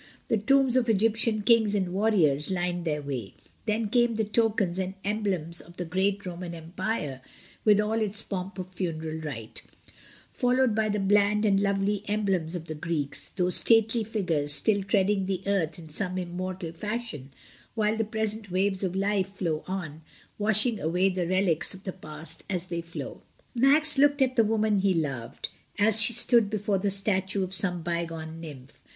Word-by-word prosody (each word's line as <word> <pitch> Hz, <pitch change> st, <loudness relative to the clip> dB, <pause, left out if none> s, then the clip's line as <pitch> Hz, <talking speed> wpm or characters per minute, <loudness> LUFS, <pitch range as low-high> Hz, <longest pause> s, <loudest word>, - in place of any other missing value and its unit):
The 225 Hz, -, +2 dB
tombs 265 Hz, +3 st, +3 dB
of 250 Hz, -2 st, +2 dB
Egyptian 220 Hz, 0 st, +1 dB
kings 220 Hz, -2 st, +3 dB
and 185 Hz, -3 st, -1 dB
warriors 185 Hz, -9 st, +3 dB
lined 175 Hz, -1 st, -2 dB
their 150 Hz, -2 st, -2 dB
way; 130 Hz, -8 st, -5 dB, 0.3 s
then 215 Hz, +1 st, 0 dB
came 240 Hz, +1 st, +2 dB
the 220 Hz, -, 0 dB
tokens 210 Hz, -4 st, 0 dB
and 190 Hz, 0 st, -3 dB
emblems 195 Hz, -6 st, 0 dB
of 175 Hz, +1 st, -17 dB
the 175 Hz, -, -3 dB
great 195 Hz, +4 st, -1 dB
Roman 175 Hz, -1 st, -6 dB
empire, 165 Hz, -, -4 dB, 0.4 s
with 210 Hz, -1 st, +5 dB
all 220 Hz, +2 st, 0 dB
its 215 Hz, +1 st, -1 dB
pomp 190 Hz, 0 st, -5 dB
of 185 Hz, 0 st, -7 dB
funeral 160 Hz, -4 st, -4 dB
rite; 125 Hz, -8 st, -6 dB, 0.7 s
followed 250 Hz, -2 st, +2 dB
by 215 Hz, 0 st, 0 dB
the 210 Hz, 0 st, -1 dB
bland 205 Hz, +2 st, +2 dB
and 195 Hz, -2 st, +3 dB
lovely 200 Hz, 0 st, 0 dB
emblems 195 Hz, -5 st, -1 dB
of 170 Hz, -2 st, -6 dB
the 160 Hz, -, -6 dB
Greeks, 155 Hz, -2 st, -3 dB
those 180 Hz, -1 st, +3 dB
stately 225 Hz, 0 st, +3 dB
figures 180 Hz, -9 st, -1 dB
still 200 Hz, +6 st, +1 dB
treading 195 Hz, 0 st, +1 dB
the 190 Hz, -1 st, -3 dB
earth 180 Hz, -6 st, -1 dB
in 160 Hz, -2 st, -12 dB
some 185 Hz, +4 st, -1 dB
immortal 180 Hz, -1 st, -5 dB
fashion, 205 Hz, -, -5 dB, 0.4 s
while 215 Hz, 0 st, +1 dB
the 225 Hz, -, 0 dB
present 220 Hz, -1 st, -3 dB
waves 190 Hz, +1 st, 0 dB
of 185 Hz, -1 st, -2 dB
life 195 Hz, 0 st, 0 dB
flow 170 Hz, -5 st, -3 dB
on, 170 Hz, -5 st, -5 dB, 0.4 s
washing 215 Hz, +2 st, +3 dB
away 180 Hz, +4 st, +1 dB
the 180 Hz, -2 st, -2 dB
relics 185 Hz, -1 st, +1 dB
of 190 Hz, -, -14 dB
the 185 Hz, -, -5 dB
past 155 Hz, -3 st, -3 dB
as 180 Hz, -2 st, -2 dB
they 170 Hz, -1 st, -3 dB
flow. 170 Hz, 0 st, -8 dB, 0.3 s
Max 285 Hz, +4 st, +6 dB
looked 285 Hz, -1 st, +4 dB
at 255 Hz, -1 st, -1 dB
the 230 Hz, -, +5 dB
woman 215 Hz, -1 st, +1 dB
he 190 Hz, -1 st, +2 dB
loved, 135 Hz, -8 st, -4 dB, 0.3 s
as 220 Hz, +1 st, +5 dB
she 220 Hz, -, +5 dB
stood 235 Hz, -2 st, +6 dB
before 205 Hz, -2 st, -1 dB
the 200 Hz, -, 0 dB
statue 195 Hz, 0 st, +1 dB
of 185 Hz, 0 st, -5 dB
some 180 Hz, -3 st, +1 dB
bygone 165 Hz, -1 st, -4 dB
nymph. 140 Hz, -4 st, -11 dB
195 Hz, 175 wpm, -27 LUFS, 170-215 Hz, 0.7 s, Max